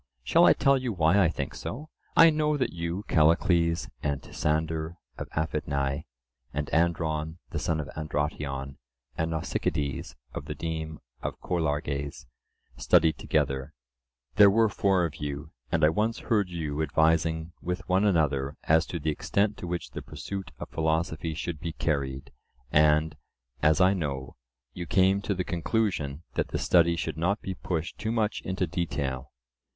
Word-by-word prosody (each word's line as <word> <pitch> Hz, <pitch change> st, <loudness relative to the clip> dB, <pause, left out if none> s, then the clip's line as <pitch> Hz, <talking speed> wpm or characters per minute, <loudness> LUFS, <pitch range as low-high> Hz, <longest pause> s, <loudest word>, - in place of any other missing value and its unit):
Shall 60 Hz, -, +5 dB
I -, -, +8 dB
tell 135 Hz, 0 st, +3 dB
you 125 Hz, -2 st, -2 dB
why 90 Hz, +1 st, +4 dB
I 85 Hz, -, +4 dB
think 70 Hz, -4 st, -4 dB
so? 150 Hz, +5 st, -6 dB, 0.3 s
I 165 Hz, 0 st, +9 dB
know 150 Hz, -1 st, +1 dB
that 130 Hz, -, -1 dB
you, 85 Hz, +3 st, -3 dB
Callicles, 85 Hz, +1 st, +3 dB
and 70 Hz, -2 st, -1 dB
Tisander 80 Hz, +1 st, -1 dB, 0.2 s
of -, -, -4 dB
Aphidnae, 70 Hz, -2 st, -1 dB, 0.5 s
and 75 Hz, 0 st, -3 dB
Andron 80 Hz, -1 st, +1 dB
the -, -, -2 dB
son 80 Hz, -, 0 dB
of 75 Hz, -, -4 dB
Androtion, 75 Hz, -3 st, -3 dB, 0.4 s
and 80 Hz, +1 st, -1 dB
Nausicydes 75 Hz, -3 st, -2 dB, 0.2 s
of -, -, -5 dB
the -, -, -5 dB
deme 80 Hz, -1 st, -4 dB, 0.2 s
of -, -, -4 dB
Cholarges, 75 Hz, -4 st, -2 dB, 0.5 s
studied 80 Hz, -3 st, +3 dB
together: 70 Hz, -1 st, -1 dB, 0.6 s
there 105 Hz, -1 st, +9 dB
were 110 Hz, +2 st, +4 dB
four 95 Hz, -3 st, +2 dB
of 80 Hz, -3 st, -5 dB
you, 75 Hz, +1 st, -5 dB, 0.2 s
and 80 Hz, -1 st, +1 dB
I -, -, +6 dB
once 110 Hz, +7 st, 0 dB
heard 105 Hz, -6 st, +1 dB
you 80 Hz, -4 st, -3 dB
advising 80 Hz, +1 st, +2 dB
with 90 Hz, +3 st, -4 dB
one 95 Hz, +2 st, +3 dB
another 75 Hz, -8 st, +1 dB
as 80 Hz, +2 st, +3 dB
to 85 Hz, -, -3 dB
the 75 Hz, +1 st, 0 dB
extent 100 Hz, +7 st, 0 dB
to 90 Hz, -, -6 dB
which 85 Hz, 0 st, -4 dB
the -, -, -6 dB
pursuit 95 Hz, -1 st, -6 dB
of -, -, -7 dB
philosophy 80 Hz, 0 st, -1 dB
should 80 Hz, 0 st, -4 dB
be 80 Hz, 0 st, -4 dB
carried, 70 Hz, -4 st, -2 dB, 0.4 s
and, 75 Hz, +1 st, +4 dB, 0.5 s
as 75 Hz, +3 st, +4 dB
I 95 Hz, +1 st, +5 dB
know, 70 Hz, -7 st, -3 dB, 0.4 s
you 85 Hz, -1 st, -6 dB
came 95 Hz, +2 st, +3 dB
to 100 Hz, 0 st, -1 dB
the 90 Hz, -, -1 dB
conclusion 85 Hz, -5 st, -1 dB
that -, -, 0 dB
the -, -, -3 dB
study 85 Hz, -1 st, +4 dB
should 80 Hz, -2 st, -3 dB
not 95 Hz, +6 st, +1 dB
be 95 Hz, -, -3 dB
pushed 85 Hz, -3 st, -4 dB
too 110 Hz, -, -1 dB
much 110 Hz, -2 st, 0 dB
into 95 Hz, 0 st, -1 dB
detail. 70 Hz, -6 st, -3 dB
80 Hz, 160 wpm, -28 LUFS, 75-90 Hz, 0.6 s, I